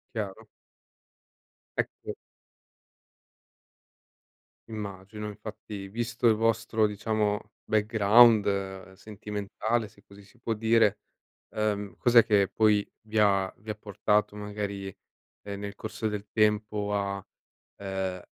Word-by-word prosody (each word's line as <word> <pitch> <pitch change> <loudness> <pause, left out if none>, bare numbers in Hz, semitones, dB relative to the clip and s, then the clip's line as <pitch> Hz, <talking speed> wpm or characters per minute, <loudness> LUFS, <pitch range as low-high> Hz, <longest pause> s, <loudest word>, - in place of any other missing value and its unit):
Chiaro. - - -4 1.3
Ecco 435 0 -3 2.6
Immagino, 105 0 -6
infatti, 105 -1 -8
visto 120 +3 -3
il 110 - +4
vostro, 110 -1 +2
diciamo, 105 0 -1
background 105 -3 +4
sentimentale, 105 +2 -3
se 105 -2 -22
così 100 0 -15
si 120 +5 -22
può 115 -1 -1
dire, 110 -1 +3 0.5
ehm, 105 -2 -2
cos'è 120 -1 +6
che, 100 -3 +4
poi, 105 -2 +2
vi 110 0 -5
ha 100 -2 +3
vi 110 - -13
ha - - -5
portato, 105 0 0
magari, 100 -1 -4 0.6
ehm, 100 -1 -6
nel 100 0 -5
corso 110 +1 -3
del 105 0 -5
tempo 105 -1 +1
a 100 -1 -2 0.5
ehm, 95 -2 -3
105 Hz, 105 wpm, -28 LUFS, 100-110 Hz, 2.6 s, cos'è